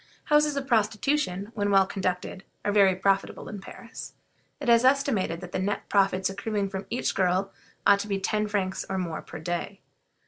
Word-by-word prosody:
Houses 300 Hz, -1 st, +3 dB
of 275 Hz, -, -2 dB
prostitution, 220 Hz, -3 st, 0 dB
when 205 Hz, -2 st, 0 dB
well 195 Hz, -1 st, +5 dB
conducted, 185 Hz, 0 st, -3 dB, 0.2 s
are 205 Hz, -, +2 dB
very 195 Hz, -2 st, +5 dB
profitable 195 Hz, +1 st, 0 dB
in 205 Hz, -2 st, -7 dB
Paris. 230 Hz, +4 st, -10 dB, 0.4 s
It 285 Hz, -, -5 dB
is 235 Hz, 0 st, +6 dB
estimated 255 Hz, -11 st, +2 dB
that 180 Hz, -, -8 dB
the -, -, -2 dB
net 200 Hz, +2 st, -2 dB
profits 195 Hz, -2 st, +3 dB
accruing 200 Hz, 0 st, -2 dB
from 195 Hz, 0 st, -5 dB
each 240 Hz, -, -1 dB
girl 185 Hz, +1 st, +1 dB, 0.3 s
ought 200 Hz, 0 st, +6 dB
to 205 Hz, -, -4 dB
be 195 Hz, -1 st, -1 dB
ten 210 Hz, +2 st, 0 dB
francs 195 Hz, -2 st, -1 dB
or 190 Hz, -, -1 dB
more 170 Hz, -4 st, -3 dB
per -, -, -9 dB
day. 175 Hz, +5 st, -4 dB
200 Hz, 180 wpm, -27 LUFS, 190-220 Hz, 0.4 s, is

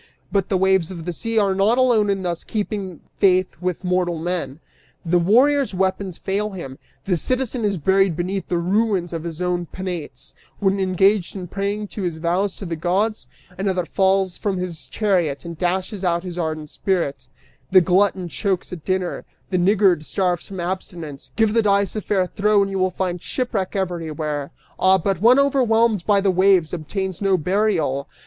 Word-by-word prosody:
But 195 Hz, -2 st, 0 dB
the 190 Hz, -, +2 dB
waves 190 Hz, -2 st, +2 dB
of 170 Hz, -4 st, -7 dB
the 175 Hz, -, -3 dB
sea 230 Hz, +5 st, -3 dB
are 200 Hz, -3 st, +3 dB
not 200 Hz, +5 st, +2 dB
alone 240 Hz, -5 st, +3 dB
in 195 Hz, -1 st, 0 dB
thus 170 Hz, -2 st, -3 dB
keeping 200 Hz, -5 st, -4 dB, 0.2 s
faith 185 Hz, -1 st, +3 dB
with 180 Hz, 0 st, -2 dB
mortal 180 Hz, -2 st, 0 dB
men: 165 Hz, -3 st, -3 dB, 0.5 s
The 175 Hz, +1 st, +3 dB
warrior's 255 Hz, +6 st, +3 dB
weapons 190 Hz, -1 st, -1 dB
fail 205 Hz, +2 st, -2 dB
him; 170 Hz, -10 st, -8 dB, 0.3 s
the 185 Hz, -, +1 dB
citizen 255 Hz, +5 st, -2 dB
is 200 Hz, -2 st, 0 dB
buried 190 Hz, +2 st, +2 dB
beneath 185 Hz, +2 st, -2 dB
the 175 Hz, -, 0 dB
ruins 185 Hz, 0 st, 0 dB
of 165 Hz, -1 st, -4 dB
his 170 Hz, +1 st, -4 dB
own 175 Hz, -1 st, -1 dB
penates, 170 Hz, -9 st, -6 dB, 0.2 s
when 195 Hz, -1 st, +1 dB
engaged 190 Hz, +1 st, +2 dB
in 185 Hz, -2 st, -6 dB
paying 200 Hz, +3 st, -3 dB
his 180 Hz, -6 st, -4 dB
vows 180 Hz, +4 st, 0 dB
to 200 Hz, -, -8 dB
the 170 Hz, -2 st, -3 dB
gods; 195 Hz, +7 st, 0 dB, 0.3 s
another 190 Hz, -2 st, 0 dB
falls 190 Hz, 0 st, +1 dB
from 200 Hz, -3 st, -1 dB
his 180 Hz, -3 st, -4 dB
chariot 180 Hz, -9 st, 0 dB
and 170 Hz, -2 st, -7 dB
dashes 185 Hz, +3 st, -1 dB
out 170 Hz, -1 st, +1 dB
his 180 Hz, -2 st, -6 dB
ardent 155 Hz, -3 st, -3 dB
spirit; 170 Hz, -9 st, -2 dB, 0.4 s
the 190 Hz, -, +7 dB
glutton 185 Hz, 0 st, +2 dB
chokes 185 Hz, +1 st, -2 dB
at 165 Hz, -4 st, -8 dB
dinner; 185 Hz, -1 st, -2 dB, 0.3 s
the 185 Hz, -, +2 dB
niggard 185 Hz, -3 st, +3 dB
starves 180 Hz, 0 st, -1 dB
from 190 Hz, -2 st, -7 dB
abstinence. 170 Hz, -5 st, -5 dB
Give 220 Hz, -2 st, +2 dB
the 230 Hz, -, +4 dB
dice 200 Hz, -1 st, +2 dB
a 215 Hz, -, -2 dB
fair 190 Hz, -2 st, +1 dB
throw 205 Hz, +2 st, +2 dB
and 195 Hz, -, -3 dB
you 195 Hz, -, -2 dB
will 185 Hz, 0 st, +2 dB
find 180 Hz, -1 st, -3 dB
shipwreck 220 Hz, -8 st, -2 dB
everywhere! 155 Hz, -6 st, -3 dB, 0.3 s
Ah, 190 Hz, 0 st, +5 dB
but 190 Hz, 0 st, -1 dB
one 240 Hz, +4 st, +6 dB
overwhelmed 235 Hz, -8 st, +2 dB
by 205 Hz, -2 st, +4 dB
the 195 Hz, -1 st, +3 dB
waves 185 Hz, -3 st, +3 dB
obtains 185 Hz, +3 st, -4 dB
no 195 Hz, -2 st, +3 dB
burial! 175 Hz, -6 st, 0 dB
190 Hz, 180 wpm, -21 LUFS, 175-200 Hz, 0.5 s, the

